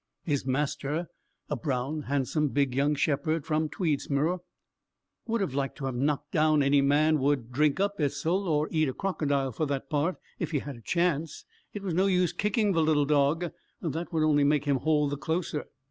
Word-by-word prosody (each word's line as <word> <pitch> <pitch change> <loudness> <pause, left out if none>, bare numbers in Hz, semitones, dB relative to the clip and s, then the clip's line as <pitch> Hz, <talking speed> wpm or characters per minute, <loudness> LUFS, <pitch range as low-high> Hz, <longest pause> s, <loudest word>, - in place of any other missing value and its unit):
His 140 -4 -1
master, 150 +4 -1 0.4
a 150 - -2
brown, 135 +3 -2
handsome, 145 +2 +1
big 140 -2 0
young 140 +3 +2
shepherd 150 +2 0
from 155 0 0
Tweedsmuir, 155 +1 0 0.9
would 230 -1 0
have 185 -9 -1
liked 135 0 -2
to 135 - -5
have 135 - -2
knocked 145 +3 -1
down 155 -2 +3
any 140 0 +4
man, 150 +3 +3
would 135 -3 0
"drink 150 +5 +2
up 200 0 0
Esil, 160 +7 0
or 155 -1 +1
eat 155 -3 +2
a - - -3
crocodile," 145 -8 -1
for 155 +6 -2
that 140 +2 -3
part, 155 +5 +1 0.2
if 170 - -2
he 155 - 0
had 140 0 -5
a - - -14
chance: 165 +1 -1 0.3
it 205 - -7
was 185 -4 -2
no 185 +4 +3
use 180 -2 +2
kicking 210 0 +1
the 165 -3 +2
little 155 -2 +3
dog; 150 +4 +2 0.3
that 165 +1 -4
would 160 -2 +1
only 150 -2 +4
make 145 0 +2
him 140 -2 +2
hold 150 +1 +1
the 145 - -2
closer. 160 +1 -2
150 Hz, 190 wpm, -28 LUFS, 140-165 Hz, 0.9 s, any